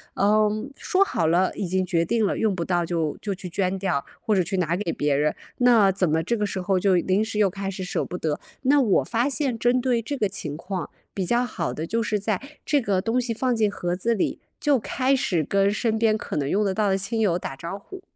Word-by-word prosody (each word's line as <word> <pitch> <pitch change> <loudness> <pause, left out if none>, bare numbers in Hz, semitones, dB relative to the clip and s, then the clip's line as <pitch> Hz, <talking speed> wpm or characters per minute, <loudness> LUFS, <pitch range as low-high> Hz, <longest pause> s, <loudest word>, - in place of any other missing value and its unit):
嗯， 215 +4 +2
说 375 +6 +2
好 165 - 0
了 180 +3 +2
已 200 - -3
经 185 +1 0
决 170 -2 +1
定 225 +4 +1
了， - - 0
用 215 -3 +1
不 170 - -2
到 175 -2 +1
就 165 -3 -1
就 205 - -2
去 185 -1 -7
捐 185 +2 -1
掉， 180 -8 0 0.2
或 220 -3 +1
者 185 - +3
去 185 +3 -2
拿 170 -2 +1
给 180 -2 -2
别 145 -2 0
人， 150 +2 +2 0.3
那 230 -5 +5
怎 185 -3 +1
么 160 +1 +2
这 235 +8 0
个 210 -2 0
时 195 - -3
候 185 0 +1
就 190 0 +3
临 190 +4 +2
时 220 -1 -3
又 205 -2 +4
开 195 +1 -4
始 195 -1 -5
舍 180 - -1
不 180 - -5
得， 155 -3 -2 0.2
那 280 +2 +4
我 210 -7 +3
发 240 +4 0
现 270 -4 0
针 245 +2 +2
对 245 -2 +1
这 280 +5 -4
个 210 - +1
情 150 -6 -5
况， 185 0 -5 0.2
比 190 - -2
较 240 +6 +2
好 170 -8 -3
的 160 +2 -4
就 230 +4 0
是 210 -1 0
在 205 -1 -1 0.2
这 290 -2 +2
个 195 -4 0
东 225 +5 0
西 240 -1 -2
放 250 +2 0
进 215 -2 +2
盒 175 -3 -2
子 230 +6 0
里， 205 - -1 0.2
就 295 -6 +3
开 260 +4 +1
始 175 -10 0
跟 195 +5 +2
身 220 +1 0
边 220 -1 +3
可 - - -6
能 140 -2 -1
用 210 +5 +2
得 195 - +1
到 210 +1 +1
的 190 - +2
亲 200 +4 -2
友 180 -5 +2
打 135 - -5
招 170 +8 -6
呼。 380 - -11
200 Hz, 275 characters per minute, -24 LUFS, 180-230 Hz, 0.3 s, 那